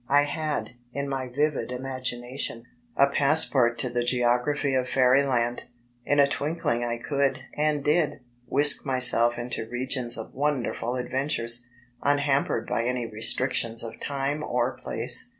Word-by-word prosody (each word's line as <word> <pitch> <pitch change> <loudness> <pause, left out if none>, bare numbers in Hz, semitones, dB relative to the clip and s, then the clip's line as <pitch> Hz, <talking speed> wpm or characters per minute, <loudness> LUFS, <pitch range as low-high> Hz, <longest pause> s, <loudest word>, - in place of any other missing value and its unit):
I 145 +1 +4
had, 145 -6 -3 0.2
in 140 +2 -4
my 135 -2 -3
vivid 145 +1 -1
imagination, 125 -1 -4 0.3
a 140 - +6
passport 140 -4 +3
to 125 - 0
the 120 0 -1
geography 125 +3 +1
of 130 -1 0
Fairyland. 125 -2 +2 0.4
In 145 - +2
a 140 - +7
twinkling 140 -4 -2
I 120 0 -2
could 140 +2 -1
and 150 -1 0
did 150 +1 +1 0.3
whisk 145 +2 +4
myself 125 -3 +5
into 120 -2 -4
regions 125 0 -2
of 110 - -8
wonderful 130 -3 -2
adventures, 125 -2 -1 0.3
unhampered 145 -1 0
by 115 - -2
any 125 -1 -2
restrictions 115 +1 +1
of 115 -1 -8
dme 140 +1 -3
or - - -1
place. - - -1
130 Hz, 135 wpm, -25 LUFS, 120-145 Hz, 0.4 s, a